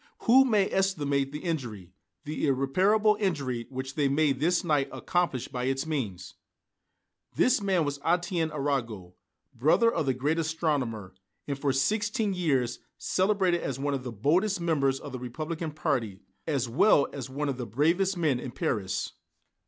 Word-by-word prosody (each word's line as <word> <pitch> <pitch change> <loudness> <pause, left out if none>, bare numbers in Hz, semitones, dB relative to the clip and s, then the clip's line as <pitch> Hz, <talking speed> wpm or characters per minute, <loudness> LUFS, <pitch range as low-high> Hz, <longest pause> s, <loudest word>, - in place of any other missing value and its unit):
Who 260 +3 +6
may 210 -6 +3
estimate 145 -8 0
the 150 +1 -7
injury, 115 - -4 0.3
the 150 0 -2
irreparable 190 +11 +3
injury 140 - -1
which 130 0 -5
they 145 -1 +1
may 150 +1 +3
this 165 +8 +1
night 150 -5 +1
accomplish 150 -1 -1
by 125 -1 -4
its 135 +2 -1
means!" 130 - -4 1.0
This 250 -3 +3
man 190 -5 +1
was 145 0 -3
Étienne 175 0 0
Arago, 120 -11 -2 0.4
brother 160 - +3
of 145 - -1
the 130 - +2
great 150 +5 0
astronomer, 145 - -2 0.3
and, 140 - -1
for 140 -1 +1
sixteen 210 - 0
years, 135 -9 0 0.2
celebrated 185 -2 +1
as 135 - -3
one 145 +1 -1
of 135 -2 -3
the 125 - -5
boldest 175 - +1
members 140 -6 +1
of 145 - -8
the 130 - -5
Republican 155 +6 -4
party, 130 - -2 0.3
as 140 -6 0
well 140 - +4
as 130 -3 -6
one 145 +3 -3
of 135 -3 -2
the 125 -2 -5
bravest 170 - +1
men 150 -7 +1
in 130 - -6
Paris. 105 -4 -2
145 Hz, 160 wpm, -28 LUFS, 130-175 Hz, 1.0 s, Who